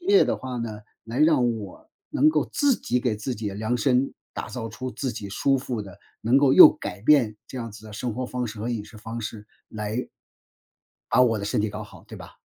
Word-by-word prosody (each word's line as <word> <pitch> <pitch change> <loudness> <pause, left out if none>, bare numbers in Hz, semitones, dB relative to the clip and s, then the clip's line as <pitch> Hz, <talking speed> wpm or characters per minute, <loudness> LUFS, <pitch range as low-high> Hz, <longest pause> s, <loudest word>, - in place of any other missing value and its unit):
这 - - -16
一 - - -9
系 - - +8
列 405 - +7
的 - - 0
话 130 -1 -6
呢， 115 -3 -4 0.3
来 115 +3 -5
让 130 -7 +3
我， 100 -3 -11 0.2
能 150 +3 +4
够 155 -1 0
自 285 -3 +3
己 125 - -1
给 120 -3 0
自 110 +5 -4
己 105 -2 -4
量 110 +5 -1
身， 130 +1 +2 0.2
打 - - -5
造 120 -3 -5
出 130 +4 -6
自 130 -1 -3
己 105 -2 -7
舒 135 +7 +1
服 125 -4 -4
的， 95 -3 -12 0.2
能 120 +5 +4
够 140 -2 +4
又 - - +11
改 100 - -7
变 115 -6 +4
这 130 - -7
样 115 -2 -5
子 105 +1 -13
的 105 - -10
生 115 +2 -3
活 130 +2 -3
方 125 0 -3
式 110 -1 -8
和 115 +3 -3
饮 115 -3 -2
食 110 - -14
方 115 +2 -6
式， 105 -1 -7 0.2
来 110 +3 -4 1.0
把 - - +5
我 115 -3 +4
的 100 - -4
身 105 - 0
体 110 - 0
搞 105 +1 -6
好， 105 - -14
对 - - -10
吧？ - - -12
115 Hz, 265 characters per minute, -25 LUFS, 105-130 Hz, 1.0 s, 又